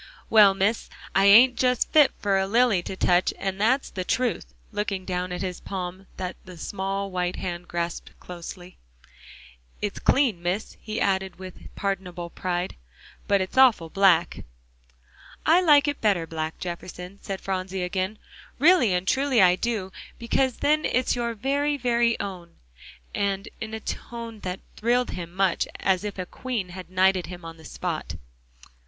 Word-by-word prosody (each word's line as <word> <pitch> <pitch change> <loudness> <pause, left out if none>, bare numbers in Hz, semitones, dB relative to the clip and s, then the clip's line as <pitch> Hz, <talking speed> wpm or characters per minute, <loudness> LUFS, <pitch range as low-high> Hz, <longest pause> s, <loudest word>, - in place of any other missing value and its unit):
"Well, 205 -3 +7
Miss, 205 +4 0 0.2
I 195 - +4
ain't 240 +5 +8
just 250 -1 +1
fit 300 -3 +6
for 195 -1 +1
a 190 - 0
lily 230 -3 +3
to 190 - -6
touch 180 0 +2
and 195 0 -3
that's 260 +6 +2
the 185 - -3
truth," 245 +5 -1 0.2
looking 200 -3 -3
down 180 -1 -2
at 180 - -3
his 180 -2 -4
palm 185 0 -6
that 185 -1 -4
the 180 -2 -12
small 195 +3 -3
white 180 -1 -1
hand 175 -1 -5
grasped 170 0 -4
closely. 180 +1 -9 1.0
"It's 205 -1 -3
clean, 245 -11 +2
Miss," 180 +5 -2
he 215 0 -4
added 190 -1 0
with 185 -1 -10
pardonable 180 -3 -3
pride, 180 0 -3 0.5
"but 200 -1 +3
it's 190 +7 -1
awful 215 -11 +5
black." 185 -4 +3 1.0
"I 335 +4 +5
like 295 -5 +5
it 285 - -2
better 195 -6 +2
black, 160 -1 -4
Jefferson," 180 +2 -7
said 195 -1 -5
Phronsie 190 -1 -3
again, 185 +3 -2 0.4
"really 285 - +5
and 180 +1 -2
truly 270 0 +2
I 180 -2 +6
do, 205 -2 -2 0.3
because 250 +2 0
then 305 +1 +2
it's 255 +1 +1
your 235 -1 -2
very, 285 +5 0
very 235 -2 +1
own," 180 -4 -6 0.6
in 195 -1 -1 0.2
a 220 0 -4
tone 230 0 -6
that 185 -1 -5 0.2
thrilled 245 +3 +1
him 170 -2 -6
much 190 -1 +1
as 190 0 +1
if 205 -2 -5
a 185 - -3
queen 230 -2 -4
had 180 0 -9
knighted 185 0 +2
him 180 -2 -9
on 165 0 -8
the 160 - -15
spot. - - -4
195 Hz, 160 wpm, -25 LUFS, 180-230 Hz, 1.0 s, ain't